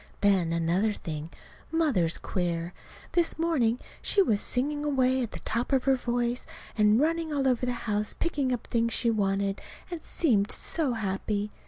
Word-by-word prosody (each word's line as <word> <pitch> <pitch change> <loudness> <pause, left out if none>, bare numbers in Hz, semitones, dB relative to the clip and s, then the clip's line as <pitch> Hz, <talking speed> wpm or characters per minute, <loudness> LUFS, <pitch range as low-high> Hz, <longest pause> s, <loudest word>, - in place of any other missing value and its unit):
Then, 190 -5 +3
another 170 +6 +1
thing, 155 -4 -6 0.4
Mother's 255 - +1
queer. 175 -1 -2 0.4
This 340 -3 +1
morning 290 -9 +2 0.2
she - - +2
was 210 - +1
singing 290 +4 -1
away 260 -3 +2
at 235 - -3
the - - -8
top 235 +5 -2
of 265 -2 +3
her 270 - +4
voice 245 -1 -1 0.3
and 210 +1 +4
running 325 +2 +1
all 275 -2 +1
over 250 -1 +1
the 250 - 0
house 210 -1 -1
picking 285 -6 -1
up 245 -3 -2
things 230 -1 +1
she 235 0 +3
wanted; 195 -2 0 0.3
and 340 -2 -4
seemed 220 -14 +1
so 300 -7 -1
happy. 205 0 -2
235 Hz, 165 wpm, -28 LUFS, 200-275 Hz, 0.4 s, her